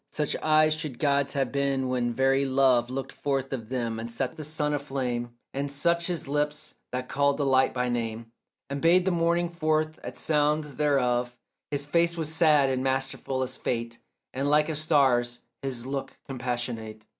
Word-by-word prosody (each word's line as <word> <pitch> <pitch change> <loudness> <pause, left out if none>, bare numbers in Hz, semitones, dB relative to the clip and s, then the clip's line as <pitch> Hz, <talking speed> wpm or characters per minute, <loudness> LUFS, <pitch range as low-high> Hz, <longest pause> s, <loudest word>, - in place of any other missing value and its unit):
Such 150 -2 -2
eyes 155 0 +4
should 155 -5 -5
God's 140 -1 +1
have 135 -3 0
been 140 -2 0
when 125 -1 0
very 135 +3 +2
love 130 -3 +3
Looked 130 +1 -4
forth 135 -1 -2
of 115 -4 -5
them 120 -3 -2
and 115 +1 -5
set 125 +4 -3
the 155 - -6
sun 150 0 -1
aflame, 125 -4 -3 0.2
And 140 +1 -2
such 170 +4 +1
his 175 -5 -2
lips 150 +1 -1 0.2
that 125 0 -3
called 140 0 +2
the 145 - 0
light 130 -1 +4
by 125 -1 -1
name 115 -1 -3 0.4
And 140 0 -4
bade 175 +2 +5
the 190 - +2
morning 170 0 +2
forth 155 -2 0
at - - -7
sound 150 0 +2 0.2
thereof; 125 -4 +1 0.3
His 145 -1 -1
face 170 +3 +2
was 160 -1 -1
sad 155 -4 +5
and 130 0 -1
masterful 135 0 -1
as 130 0 -4
fate, 115 -1 -3 0.3
And 135 +2 -1
like 150 +1 +4
a 160 - -1
star's 135 -6 +2 0.2
his 125 -3 -4
look 135 0 -4
compassionate. 120 -4 -4
135 Hz, 180 wpm, -27 LUFS, 125-150 Hz, 0.4 s, bade